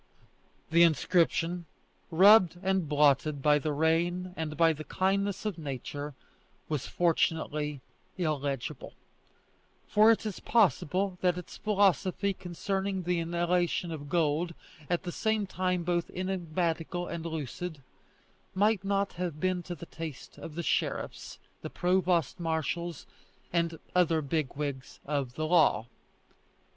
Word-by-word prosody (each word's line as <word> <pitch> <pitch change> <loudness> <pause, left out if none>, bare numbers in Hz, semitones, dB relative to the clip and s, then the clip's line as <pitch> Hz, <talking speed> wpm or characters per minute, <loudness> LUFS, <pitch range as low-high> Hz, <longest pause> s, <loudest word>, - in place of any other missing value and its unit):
The 170 +1 +5
inscription, 170 +2 +2 0.4
rubbed 185 0 +6
and 190 -4 +1
blotted 145 0 +3
by 150 0 +5
the 155 +1 -2
rain 170 +4 +1
and 155 -2 -4
by 165 0 +5
the 155 0 -7
kindness 195 +5 0
of 200 -6 -2
nature, 145 0 -5 0.5
was 150 -4 -2
fortunately 155 -4 0 0.4
illegible, 145 -6 -3 0.9
for 215 +1 +5
it 225 -1 +3
is 210 -4 -4
possible 190 - +1
that 180 -1 +2
its 180 - -8
philosophy 200 -1 +2
concerning 190 +2 -3
the 175 0 0
inhalation 175 +1 0
of 145 -3 -6
gold, 165 +1 +1 0.3
at 175 0 0
the 175 - -4
same 220 +2 0
time 180 -1 -1
both 175 0 0
enigmatical 175 -2 -2
and 170 -2 -5
lucid, 160 -1 -5 0.7
might 205 0 +2
not 200 0 0
have 175 -4 -4
been 185 +1 0
to 175 0 -6
the 170 - -9
taste 160 -4 -8
of 155 - -8
the 170 - -3
sheriffs, - - -2 0.2
the - - -5
provost 180 -1 +1
marshals, 170 +1 -2 0.5
and 170 -1 0 0.2
other 165 -3 +3
big 140 -1 -2
wigs 140 -2 -5
of 140 -4 -2
the 155 - -2
law. 155 -10 +4
170 Hz, 130 wpm, -30 LUFS, 155-185 Hz, 0.9 s, rubbed